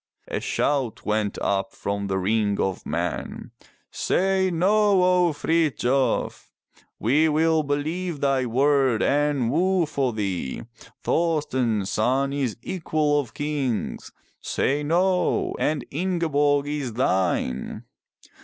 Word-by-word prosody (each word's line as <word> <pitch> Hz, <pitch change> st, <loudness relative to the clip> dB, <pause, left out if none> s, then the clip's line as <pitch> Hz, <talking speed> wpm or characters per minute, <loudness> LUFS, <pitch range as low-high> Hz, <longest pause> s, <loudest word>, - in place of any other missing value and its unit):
A -, -, -2 dB
shout 135 Hz, -6 st, -1 dB
went 105 Hz, -1 st, -1 dB
up 95 Hz, -1 st, -1 dB
from 100 Hz, 0 st, -3 dB
the 95 Hz, -1 st, -1 dB
ring 100 Hz, +1 st, 0 dB
of 95 Hz, -1 st, -2 dB
men. -, -, -4 dB, 0.4 s
"Say 190 Hz, 0 st, +1 dB
no, 195 Hz, +2 st, +3 dB
O 180 Hz, -1 st, +3 dB
Frithjof! 145 Hz, -4 st, 0 dB, 0.5 s
We 150 Hz, +8 st, +3 dB
will 160 Hz, +1 st, +2 dB
believe 155 Hz, +3 st, -2 dB
thy 135 Hz, -2 st, +1 dB
word 135 Hz, -1 st, +2 dB
and 145 Hz, -4 st, +1 dB
woo 180 Hz, +3 st, +2 dB
for 140 Hz, -4 st, -1 dB
thee. 95 Hz, -, -3 dB, 0.4 s
Thorsten's 130 Hz, -, 0 dB
son 135 Hz, +5 st, +1 dB
is 135 Hz, -6 st, -1 dB
the 115 Hz, -, -8 dB
equal 155 Hz, -4 st, +1 dB
of 130 Hz, -6 st, -6 dB
Kings. 145 Hz, -6 st, -3 dB, 0.3 s
Say 145 Hz, +2 st, 0 dB
no! 180 Hz, +4 st, +1 dB
and 150 Hz, -1 st, 0 dB
Ingeborg 145 Hz, -4 st, +1 dB
is 145 Hz, -5 st, -3 dB
thine." 95 Hz, -, -1 dB
145 Hz, 115 wpm, -24 LUFS, 115-160 Hz, 0.5 s, no